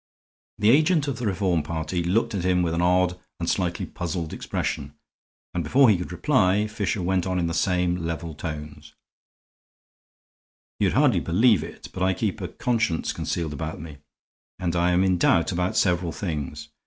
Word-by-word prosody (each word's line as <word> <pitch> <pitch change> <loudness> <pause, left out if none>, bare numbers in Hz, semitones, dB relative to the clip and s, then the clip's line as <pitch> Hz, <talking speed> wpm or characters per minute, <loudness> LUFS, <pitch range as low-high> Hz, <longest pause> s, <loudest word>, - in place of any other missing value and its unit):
The 105 +1 +4
agent 155 +2 +3
of 130 -4 -3
the 120 - -1
Reform 95 -4 +1
party 80 +3 -3
looked 115 +6 +1
at 95 -4 -2
him 90 -1 +2
with 85 -1 0
an 85 - 0
odd 90 0 +2 0.2
and - - -3
slightly - - -1
puzzled 85 -2 -4
expression, - - -3 0.6
and 90 -2 -1
before 120 - +5
he 100 - +3
could 90 - -5
reply, 95 - +2
Fisher 105 -3 -2
went 95 0 0
on 90 0 -1
in 90 - +1
the 85 - -2
same 90 0 +1
level 85 -1 -4
tones: 75 -1 -7 1.8
"You'd - - +2
hardly - - +4
believe 105 +2 +3
it, - - -10
but 95 - -6
I 95 0 +2
keep 100 +1 -2
a - - -3
conscience 115 -9 -1
concealed 80 -3 -3
about 80 +2 -5
me; 75 -2 -9 0.6
and 90 -1 -2
I 85 +1 +2
am 90 +1 +3
in 95 -2 +2
doubt 85 0 +3
about 90 +4 -1
several 90 -5 +2
things. 75 -3 -5
90 Hz, 175 wpm, -25 LUFS, 85-100 Hz, 1.8 s, before